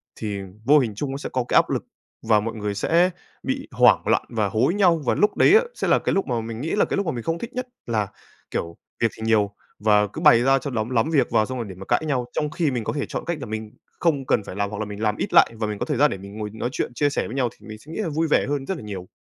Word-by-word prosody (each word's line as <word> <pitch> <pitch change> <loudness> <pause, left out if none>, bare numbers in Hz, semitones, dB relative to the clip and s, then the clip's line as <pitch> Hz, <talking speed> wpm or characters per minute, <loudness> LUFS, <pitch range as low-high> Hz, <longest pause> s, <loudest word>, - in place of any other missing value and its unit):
thì 105 -2 -4 0.3
vô 150 +2 +6
hình 115 -6 -1
trung 135 +5 -3
nó 135 - -3
sẽ - - -5
có 130 -1 +1
cái - - -1
áp - - +5
lực - - -1 0.4
và 110 -2 +3
mọi 115 +2 -3
người 105 -1 -3
sẽ 170 - +3 0.3
bị - - -3
hoảng - - +5
loạn - - +3
và 110 -4 0
hối 120 - +2
nhau. 180 -5 +3
Và - - +3
lúc 210 - +2
đấy 405 - +6
á, 455 - +7
sẽ - - -2
là - - +4
cái - - -1
lúc 195 - +1
mà 120 -3 -1
mình 115 +1 -6
nghĩ 160 - -3
là 210 - +3
cái - - -2
lúc 200 - 0
mà 160 - 0
mình 120 -2 -5
không 165 +5 -1
thích 235 +5 -7
nhất, 255 0 -3 0.2
là 110 -3 0 0.4
kiểu 85 0 -3 0.3
việc 115 - +3
thì - - -11
nhiều 105 -3 +3 0.3
và 105 -1 +4
cứ 105 - -8
bày 115 - +7
ra 135 +1 +4
cho 140 - -5
lắm 110 -2 -2
lắm 120 +1 +1
việc 150 -4 +2
vào 110 - +3
xong 130 +2 -5
rồi 115 -3 -4
để 95 - -8
mà 95 +2 -10
cãi - - +1
nhau. 130 -4 0
Trong 150 - -1
khi 155 -2 0
mình 120 -3 -2
có - - -2
thể 145 - -2
chọn - - -5
cách 170 -2 -2
là - - -4
mình 110 -1 -5 0.3
không 145 -6 +1
cần 105 - +1
phải 90 - -8
làm 100 0 -1
hoặc 105 0 -6
là 110 - -2
mình 105 0 -7
làm 105 -1 +1
ít - - -3
lại - - +7
và 110 - 0
mình 105 -1 -4
có - - -1
thời 150 -4 -1
gian 150 +3 +4
để 95 - -3
mình 100 +2 -10
ngồi 105 -1 -4
nói 110 +2 -3
chuyện, 125 - -3
chia 145 +3 +2
sẻ 145 - -2
với 120 - -7
nhau 125 -3 +1
thì - - -17
mình 110 - -8
sẽ 150 +8 -14
nghĩ 165 - -5
là 185 - -2
vui 160 +2 0
vẻ 150 - +3
hơn 145 -2 -1
rất 190 - -3
là - - -9
nhiều. 95 -4 -7
120 Hz, 320 wpm, -23 LUFS, 105-150 Hz, 0.4 s, á